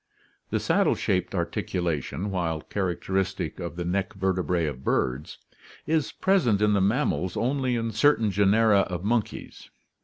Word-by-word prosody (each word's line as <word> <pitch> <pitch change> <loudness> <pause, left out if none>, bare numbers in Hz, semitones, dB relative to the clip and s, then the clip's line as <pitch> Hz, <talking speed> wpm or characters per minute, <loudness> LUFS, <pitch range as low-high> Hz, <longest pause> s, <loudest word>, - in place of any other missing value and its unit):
The - - 0
saddle - - +2
shaped 90 +1 -1
ar 85 -2 +1
ticulation, 85 +2 -3
while 80 -4 -1
characteristic 95 -1 -2
of 85 -1 -5
the 85 0 -4
neck 95 +2 -1
vertebrae 90 -3 0
of 70 -3 -5
birds, 65 +4 -1 0.5
is 160 -2 0
present 160 - +2
in 105 0 +3
the 100 - +2
mammals 100 -4 0
only 130 0 0
in 115 -1 -2
certain 110 -1 +3
genera 100 +2 +4
of 90 -2 -2
monkeys. 110 0 -3
95 Hz, 145 wpm, -26 LUFS, 90-110 Hz, 0.5 s, genera